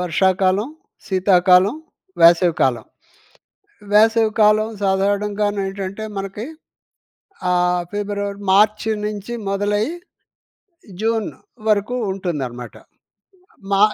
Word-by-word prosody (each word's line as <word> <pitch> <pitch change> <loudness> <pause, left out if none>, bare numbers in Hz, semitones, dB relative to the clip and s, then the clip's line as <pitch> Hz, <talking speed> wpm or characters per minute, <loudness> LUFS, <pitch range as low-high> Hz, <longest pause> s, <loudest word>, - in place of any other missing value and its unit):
వర్షాకాలం, 190 - +1 0.4
శీతాకాలం, 185 +2 +4 0.5
వేసవి 170 0 +6
కాలం. 130 -3 +1 1.1
వేసవి 220 +1 +4
కాలం 215 +1 +4 0.2
సాధారణంగా 200 +2 0
నేంటంటే 195 +1 -4
మనకి 195 +4 -5 1.0
ఆహ్, 180 0 +1
ఫిబ్రవరి, 205 -1 -3
మార్చి 215 +2 +3 0.2
నుంచి 210 +2 -6 0.2
మొదలై 205 +1 0 1.2
జూన్ 225 -1 0 0.4
వరకు 210 +3 +1 0.2
ఉంటుందనమాట. 135 -11 -5 1.0
మా 195 0 +2
200 Hz, 75 wpm, -20 LUFS, 185-210 Hz, 1.2 s, వేసవి